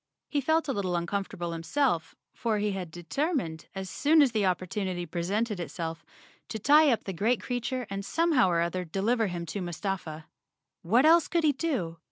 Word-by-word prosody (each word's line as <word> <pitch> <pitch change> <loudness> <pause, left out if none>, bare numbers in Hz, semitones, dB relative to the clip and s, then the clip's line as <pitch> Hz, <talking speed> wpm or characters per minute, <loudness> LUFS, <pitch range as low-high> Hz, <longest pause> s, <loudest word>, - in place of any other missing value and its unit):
He 290 - 0
felt 315 +3 +1
a 275 - 0
little 185 -4 -1
uncomfortable 175 0 -3
himself, 165 - 0 0.2
for 225 -3 -1
he 210 0 0
had 185 -3 -4
determined, 175 - -2
as 190 0 -4
soon 300 - +4
as 265 - +2
the 215 -4 +1
opportunity 185 0 -2
presented 195 +6 -2
itself, 165 -1 -5 0.5
to - - -3
tie 295 +6 +5
up 230 - 0
the 195 - -4
great 220 +8 +1
creature 250 0 -3
and 195 0 -4
somehow 305 - +3
or 170 -1 +2
other 170 +2 -1
deliver 210 +7 0
him 175 -2 -4
to 195 +5 -4
Mustafa. 175 -3 -4 0.6
What 235 - +3
else 330 +1 +6
could 340 -2 0
he 305 - +5
do? 255 - -2
200 Hz, 180 wpm, -28 LUFS, 175-255 Hz, 0.6 s, else